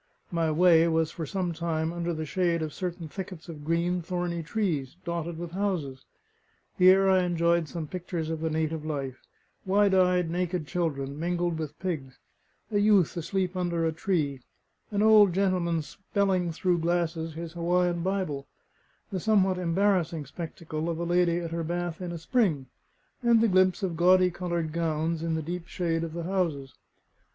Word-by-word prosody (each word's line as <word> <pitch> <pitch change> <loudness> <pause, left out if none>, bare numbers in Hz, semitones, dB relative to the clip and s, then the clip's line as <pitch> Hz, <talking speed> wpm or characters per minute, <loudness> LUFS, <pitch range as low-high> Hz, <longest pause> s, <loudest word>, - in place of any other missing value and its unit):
My 165 -2 +1
way 165 +1 +5
was 160 -1 +1
for 160 -3 -5
some 180 +1 -2
time 165 0 -2
under 175 0 -2
the 155 -1 -3
shade 170 0 0
of 155 -2 -4
certain 175 -2 -4
thickets 185 0 -8
of 155 -3 -8
green, 170 +3 0
thorny 175 0 -2
trees, 160 -7 -2
dotted 170 -1 -3
with 170 0 -6
houses. 175 -9 -2 0.7
Here 190 +1 +6
I 190 -1 +5
enjoyed 170 -2 +1
some 165 -3 -4
pictures 170 -1 -4
of 160 -1 -3
the 160 - 0
native 160 0 -1
life: 140 -4 -4 0.4
wide 200 +1 +3
eyed, 180 -2 +3
naked 180 -2 -1
children, 145 -5 -2
mingled 175 0 -1
with 155 -3 -5
pigs; 150 -9 -4 0.5
a 205 - +2
youth 205 -5 +4
asleep 180 +2 -2
under 175 -2 0
a 160 - +1
tree; 155 -6 -1 0.5
an 205 0 0
old 210 -4 +7
gentleman 180 -4 +1
spelling 190 0 -1
through 175 +2 +1
glasses 165 -1 -1
his 165 0 -6
Hawaiian 175 0 +1
Bible; 185 -7 -2 0.6
the 190 - -2
somewhat 190 -2 +2
embarrassing 175 -3 +1
spectacle 160 +1 -5
of 165 - -2
a 170 - -2
lady 175 0 +2
at 170 -1 -4
her 165 0 -2
bath 175 +1 -3
in 180 -1 -4
a 170 - -4
spring; 165 - +1 0.6
and 235 -2 +5
the 230 - +4
glimpse 185 0 +3
of 180 -3 -1
gaudy 180 +1 +5
coloured 170 -3 -3
gowns 165 0 -1
in 165 -1 -1
the 160 - -2
deep 175 +2 -5
shade 165 -2 -1
of 165 -1 -5
the 170 0 -4
houses. 165 -7 -1
170 Hz, 170 wpm, -28 LUFS, 160-185 Hz, 0.7 s, old